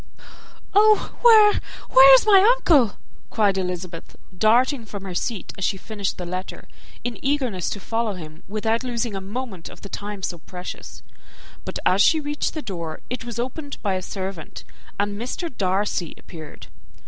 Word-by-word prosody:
"Oh! 425 +1 +4
where, 435 -3 +7 0.3
where 270 +1 +9
is 260 - +3
my 400 -3 +7 0.2
uncle?" 280 - +3 0.3
cried 205 -3 +2
Elizabeth, 180 -2 -5 0.2
darting 235 +6 +3
from 205 -3 -8
her 190 -2 -6
seat 210 +3 -3
as - - -3
she 195 - 0
finished 205 0 -4
the 180 - -5
letter, 185 +2 -6 0.4
in 240 -4 -5
eagerness 260 -10 0
to 205 - -4
follow 225 +1 -2
him, 160 -3 -10
without 220 +3 -1
losing 235 -3 -2
a 195 - -4
moment 200 -3 -6
of - - -14
the 200 - -9
time 205 -1 -6
so 175 -2 -3
precious; 180 +2 -9 0.6
but - - -4
as 190 +2 +4
she 320 +9 +5
reached 295 +1 -3
the 310 - -4
door, 170 -5 -6
it 250 -2 -4
was 235 -2 -6
opened 280 +4 -4
by 200 -3 +1
a 185 - -2
servant, 190 -4 -6 0.4
and 205 +1 -1
Mr. 255 +4 -5
Darcy 190 -3 -1
appeared. 155 -3 -11
210 Hz, 165 wpm, -23 LUFS, 185-255 Hz, 0.6 s, where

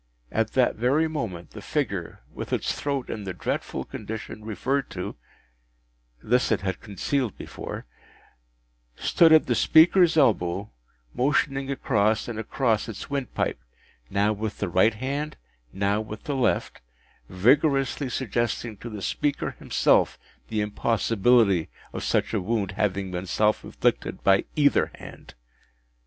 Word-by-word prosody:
At 110 0 0
that 130 -2 +2
very 135 +8 +2
moment, 110 - -5
the - - -9
figure, - - -3
with - - -6
its - - 0
throat 140 -3 -2
in 105 - -5
the 95 -2 -4
dreadful - - -3
condition 110 0 -7
referred 130 +5 -1
to 90 -1 -5 1.1
(this 125 +2 +2
it 110 - +2
had 95 -1 -2
concealed 115 +3 -2
before), - - -7 1.1
stood 165 - +4
at 160 -1 +7
the - - +1
speaker’s 170 +1 +5
elbow, 100 - +2 0.4
motioning 135 0 +1
across 110 -5 +1
and 115 -2 -4
across 115 0 0
its 110 +5 -8
windpipe, 135 - -2 0.5
now 100 +2 +2
with 105 0 -4
the - - -2
right 95 +6 +3
hand, 140 +6 -3 0.3
now 100 +2 0
with 110 0 -8
the 145 - -2
left, 125 - 0 0.5
vigorously 135 - +2
suggesting 120 -2 -2
to 120 - -8
the 105 -3 -7
speaker 145 +9 -1
himself - - +2 0.3
the 110 -1 -1
impossibility 105 -2 +2 0.2
of - - -4
such - - 0
a 105 - +1
wound 100 0 -1
having 95 -1 -1
been 90 +1 -4
self 105 +3 +1
inflicted - - -1
by 95 0 +4
either 145 -2 +3
hand. - - -12
110 Hz, 135 wpm, -25 LUFS, 100-135 Hz, 1.1 s, at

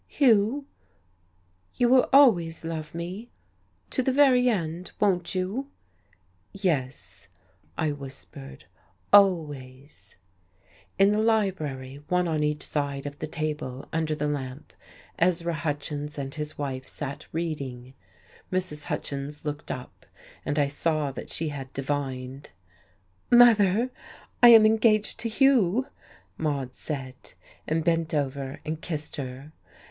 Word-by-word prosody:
"Hugh, 245 +1 +3 1.1
you 245 - +3
will 255 +1 +5
always 175 - +5
love 160 -1 -5
me 185 +8 -6 0.6
to - - +1
the 265 - +1
very 255 -2 +5
end, 175 -4 -3
won't 185 -3 +1
you?" 200 +10 -2 0.8
"Yes," 130 - -3 0.5
I 155 -2 +1
whispered, 130 - -9 0.5
"always." 145 - +2 0.8
In 195 +1 +5
the 210 - +1
library, 155 -12 -1
one 180 0 +1
on 155 -2 0
each 150 0 -1
side 140 -2 -2
of 145 0 -7
the 155 - -4
table, 150 -4 -4
under 160 -1 0
the 150 -1 -1
lamp, 135 -1 -5 0.5
Ezra 170 -1 +2
Hutchins 150 -1 -4
and 135 -1 -4
his 150 -1 -6
wife 135 -2 -4
sat 145 0 -6
reading. 140 -6 -4 0.6
Mrs. 180 -5 -2
Hutchins 145 +2 -5
looked 150 0 -4
up, 125 - -7 0.4
and 145 - -2
I 145 -1 +3
saw 150 0 -1
that - - -8
she 160 -1 -2
had 135 -2 -7
divined. 135 -1 -4 0.8
"Mother, 235 -1 +6 0.5
I 240 - +10
am 225 -2 +9
engaged 215 -1 +3
to 230 - -1
Hugh," 250 -2 +3 0.5
Maude 140 -5 -2
said, 130 -3 -7 0.3
and 160 +1 0
bent 165 -1 +1
over 140 -1 -3
and 155 0 -4
kissed 155 -3 -5
her. 135 +2 -7
155 Hz, 120 wpm, -26 LUFS, 140-195 Hz, 1.1 s, I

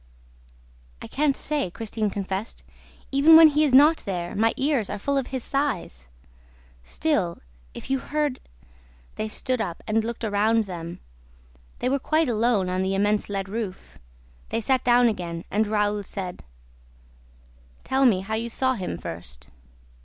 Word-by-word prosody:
"I - - -9
can't 285 -1 +1
say," 295 -10 -2
Christine 220 +2 -3
confessed. 195 +2 -5 0.5
"Even 285 +4 +7
when 320 -1 +10
he 300 +1 +2
is 295 - +2
not 295 +5 +7
there, 175 -3 -4
my 225 +2 +3
ears 270 -7 0
are - - -3
full 280 +8 -1
of 270 -2 0
his 260 -3 -4
sighs. 210 - -2 0.7
Still, 185 - -1 0.4
if - - -8
you 270 0 0
heard 295 -1 -2 0.4
..." - - -29
They 220 - -2
stood 255 +2 -2
up 175 -6 -5
and 220 0 +1
looked 235 +1 -5
around 220 +1 +2
them. 170 -3 -7 0.8
They - - -2
were 275 +2 +1
quite 310 +1 +1
alone 225 -4 +1
on 185 0 -1
the 190 +1 0
immense 205 +2 +1
lead 195 -1 -3
roof. 200 -2 -6 0.5
They - - -1
sat 255 +3 +1
down 245 0 +5
again 170 -6 -3
and 215 +2 +1
Raoul 210 -1 0
said: 185 -2 -6 1.4
"Tell 265 +1 +1
me 190 -6 +3
how 205 +3 -5
you 230 +2 -2
saw 260 +2 +1
him 185 - -4
first." 80 -9 -9
220 Hz, 160 wpm, -25 LUFS, 190-265 Hz, 1.4 s, when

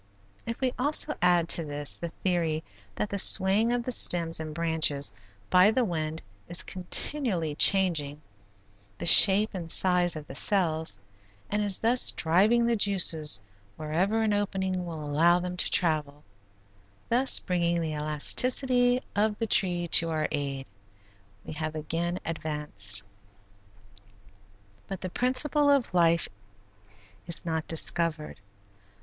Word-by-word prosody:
If 230 - -5
we 255 -2 -1
also 300 +3 +1
add 175 -1 +3
to 165 - +4
this 145 -1 -3
the 170 - -5
theory 165 -4 -1 0.3
that 210 - -3
the 200 - -2
swaying 200 +5 +4
of 245 0 -1
the 255 - -4
stems 170 -8 +3
and 155 -1 -6
branches 155 -5 0 0.4
by 180 +2 +5
the 245 +2 0
wind 160 -4 -5 0.2
is 175 - -2
continually 185 - -1
changing 160 -4 +2 0.8
the - - -6
shape 200 +4 +6
and 175 -4 -7
size 180 -2 +3
of 155 -1 -8
the 135 - -11
cells 160 - +1 0.5
and 210 +1 -1
is 205 -2 0
thus 240 +2 +3
driving 205 +9 +2
the 235 0 +1
juices 170 - 0 0.4
wherever 180 +9 -1
an 215 -1 0
opening 190 -3 -3
will 160 -3 -7
allow 160 +4 +2
them 180 0 -5
to 180 - +1
travel, 150 -4 -1 0.9
thus 255 +3 +4
bringing 175 -2 -2
the 160 -2 -4
elasticity 245 - +1
of 210 0 0
the 230 - -2
tree 175 -5 0
to 165 +1 +4
our 155 -1 -2
aid, 140 -2 -4 0.8
we - - -8
have 155 0 -5
again 165 +3 -4
advanced. 150 -12 0 1.8
But 195 - -7
the 185 - -6
principle 280 - +1
of 280 -8 +1
life 170 -1 +2 1.0
is 170 - -5
not 160 -2 -3
discovered. 160 -4 -2
175 Hz, 135 wpm, -26 LUFS, 155-205 Hz, 1.8 s, shape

